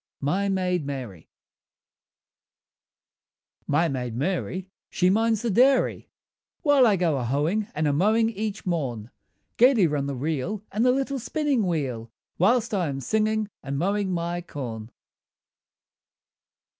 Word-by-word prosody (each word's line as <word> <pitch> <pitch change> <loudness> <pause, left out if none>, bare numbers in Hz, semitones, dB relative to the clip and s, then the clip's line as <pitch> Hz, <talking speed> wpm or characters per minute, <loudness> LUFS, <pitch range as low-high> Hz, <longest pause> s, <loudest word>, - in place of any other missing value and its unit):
MY 190 +8 0
MAID 180 -3 0
MARY 125 - -7 2.4
My 155 +4 +2
maid 125 -5 -3
Mary 185 +5 -2 0.2
she 180 +1 +2
minds 225 +2 +1
the 235 - 0
dairy, 260 +6 +3 0.5
While 285 -5 +5
I 210 - +4
go 170 -5 +1
a - - -2
hoeing 155 - 0
and 155 0 0
a 145 - +2
mowing 220 +8 +3
each 215 -1 -4
morn; 130 - -3 0.5
Gaily 245 -5 +5
run 145 -3 -1
the 140 - -3
reel 160 - -3
and 215 +3 0
the 250 - +5
little 270 +1 -1
spinning 270 -4 0
wheel, 130 -9 -3 0.3
Whilst 225 +5 +2
I 185 -5 +1
am 135 -1 -3
singing 215 - 0
and 140 0 -4
mowing 195 +4 0
my 175 0 -2
corn. 120 -9 -7
180 Hz, 130 wpm, -25 LUFS, 140-215 Hz, 2.4 s, While